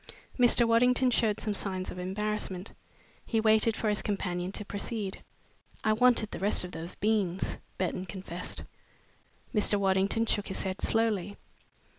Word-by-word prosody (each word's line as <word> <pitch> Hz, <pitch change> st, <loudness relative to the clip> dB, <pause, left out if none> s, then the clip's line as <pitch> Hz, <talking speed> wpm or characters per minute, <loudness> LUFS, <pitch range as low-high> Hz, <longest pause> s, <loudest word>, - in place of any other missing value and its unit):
Mr. 240 Hz, -1 st, +6 dB
Waddington 250 Hz, +2 st, +4 dB
showed 220 Hz, -3 st, +1 dB
some 215 Hz, -, -1 dB
signs 190 Hz, -2 st, -3 dB
of 180 Hz, -, -7 dB
embarrassment. 195 Hz, 0 st, -3 dB, 0.5 s
He 225 Hz, -, 0 dB
waited 220 Hz, 0 st, +3 dB
for 220 Hz, -, -1 dB
his 210 Hz, 0 st, +1 dB
companion 180 Hz, -3 st, -2 dB
to 210 Hz, -, -5 dB
proceed. 200 Hz, 0 st, -4 dB, 0.6 s
"I 215 Hz, -, +3 dB
wanted 235 Hz, -1 st, +4 dB
the -, -, -5 dB
rest 200 Hz, 0 st, +2 dB
of 180 Hz, -, -6 dB
those 170 Hz, +1 st, -6 dB
beans," 200 Hz, -4 st, 0 dB, 0.2 s
Burton 185 Hz, 0 st, -2 dB
confessed. 180 Hz, 0 st, -5 dB, 0.9 s
Mr. 210 Hz, -1 st, +3 dB
Waddington 195 Hz, +3 st, +2 dB
shook 205 Hz, -2 st, -1 dB
his 190 Hz, -, -4 dB
head 190 Hz, 0 st, -4 dB
slowly. 210 Hz, -4 st, +1 dB
205 Hz, 145 wpm, -29 LUFS, 190-220 Hz, 0.9 s, Mr